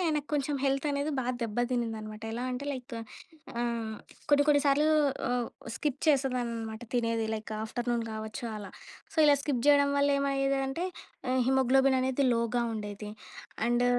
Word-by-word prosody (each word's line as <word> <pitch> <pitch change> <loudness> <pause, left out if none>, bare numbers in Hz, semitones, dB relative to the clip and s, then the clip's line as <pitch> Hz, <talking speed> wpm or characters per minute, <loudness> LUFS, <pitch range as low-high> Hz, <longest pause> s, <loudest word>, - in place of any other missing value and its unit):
నాకు 295 0 -2
కొంచెం 285 0 0
హెల్త్ 275 +2 +1
అనేది 285 +2 -1
బాగా 250 +1 -1
దెబ్బతినిందనమాట. 225 -2 -2
ఎలా 245 +2 -3
అంటే 275 +3 -4
లైక్ 250 -2 -7 0.6
ఆహ్, 230 -2 -2 0.4
కొన్ని 290 0 +6
కొన్ని 285 -1 +5
సార్లు 295 +2 +4 0.4
ఆహ్, 245 -1 0 0.3
స్కిప్ 285 -2 -2
చేసేదాన్ననమాట 240 -5 0
తినేది, 230 -2 +1
లైక్ 215 0 -6
ఆఫ్టర్‌నూన్ 240 +1 -1
కావచ్చు 220 +2 -5
అలా. 205 - -8 0.4
సో, - - -15
ఇలా 290 -1 +7
స్కిప్ 255 -5 -1
చేయడం 285 -1 +6
వల్ల 285 0 +4
ఏమయ్యేది 275 0 +1
అంటే 330 +7 -2 0.4
ఆహ్, 260 0 +3
హీమోగ్లోబిన్ 265 0 +4
అనేది 265 +1 +1
లోగా 235 +1 +1
ఉండేది, 210 -1 -5 0.6
అండ్ 240 +1 +3
250 Hz, 145 wpm, -30 LUFS, 230-275 Hz, 0.6 s, ఇలా